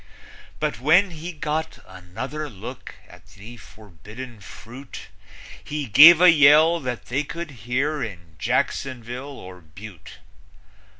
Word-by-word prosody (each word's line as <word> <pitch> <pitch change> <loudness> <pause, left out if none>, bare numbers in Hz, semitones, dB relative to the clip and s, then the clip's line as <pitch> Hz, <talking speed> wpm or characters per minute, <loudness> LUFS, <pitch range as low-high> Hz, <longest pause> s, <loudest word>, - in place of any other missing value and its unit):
But 110 - -3
when 175 +9 +3
he 165 +2 -8
got 155 0 -4
another 115 +12 -7
look 115 +3 -10
at 90 0 -17
the 110 +4 -12
forbidden 110 +4 -13
fruit 120 +6 -12 0.5
He 150 -1 -5
gave 150 +9 +8
a 180 0 +7
yell 155 +2 +5
that 125 -5 -6
they 135 +4 -2
could 165 +2 -8
hear 130 +6 -3
in 85 -8 -8
Jacksonville 130 +2 -3
or 90 -1 -12
Butte. 90 +4 -13
130 Hz, 120 wpm, -22 LUFS, 105-150 Hz, 0.5 s, gave